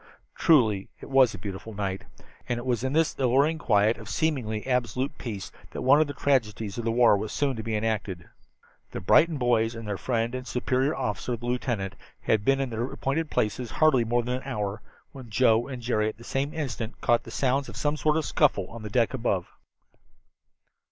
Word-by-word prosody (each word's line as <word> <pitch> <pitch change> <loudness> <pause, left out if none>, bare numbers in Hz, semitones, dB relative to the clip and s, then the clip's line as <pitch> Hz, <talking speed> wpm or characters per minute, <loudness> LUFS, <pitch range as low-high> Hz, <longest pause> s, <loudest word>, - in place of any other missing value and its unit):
Truly 110 -11 +3
it - - -11
was 130 -5 +5
a - - -7
beautiful 100 +3 -7
night. 95 -2 -3 0.4
And 120 - 0
it 120 - -6
was 120 -2 0
in 130 +1 -1
this 160 +1 +2
alluring 140 +5 +3
quiet 110 -4 +3
of 110 - -10
seemingly 125 -9 -1
absolute 125 +1 -1
peace 105 -6 -6 0.2
that - - -4
one 140 +4 +6
of 155 - +2
the 145 - -6
tragedies 115 -7 0
of 115 - -4
war 115 -1 +5
soon 145 - 0
was 130 - -4
to - - -3
be 110 0 -3
enacted. 105 -5 -2 0.7
The - - -3
Brighton 160 - +4
boys 120 -2 +1
and 115 -1 -7
their 100 -2 -3
friend 115 -1 -1
and 130 0 -5
superior 130 +3 0
officer, 120 -1 -2
the 120 - -9
lieutenant, 120 -5 -2 0.3
had 110 -2 +1
been 135 +4 +3
in 135 -3 -2
their 115 +1 -1
appointed 150 +4 -2
places 110 +3 -1
hardly 155 -4 +3
more 120 +1 +1
than 125 +1 -2
an 130 - -9
hour 105 -5 -3 0.3
when 130 -4 -11
Joe 115 0 +3
and 130 -3 -7
Jerry 110 -2 +1
at - - -9
the 115 - -13
same 135 +4 -2
instant 120 -8 -4
caught 120 0 +3
the - - -12
sounds 135 +1 0
of - - -9
some 145 0 0
sort 155 0 +1
of 160 - -1
scuffle 135 - +2
on 115 - -8
the 105 - -6
deck 115 +3 +1
above. 115 -8 0
120 Hz, 205 wpm, -27 LUFS, 110-135 Hz, 0.7 s, one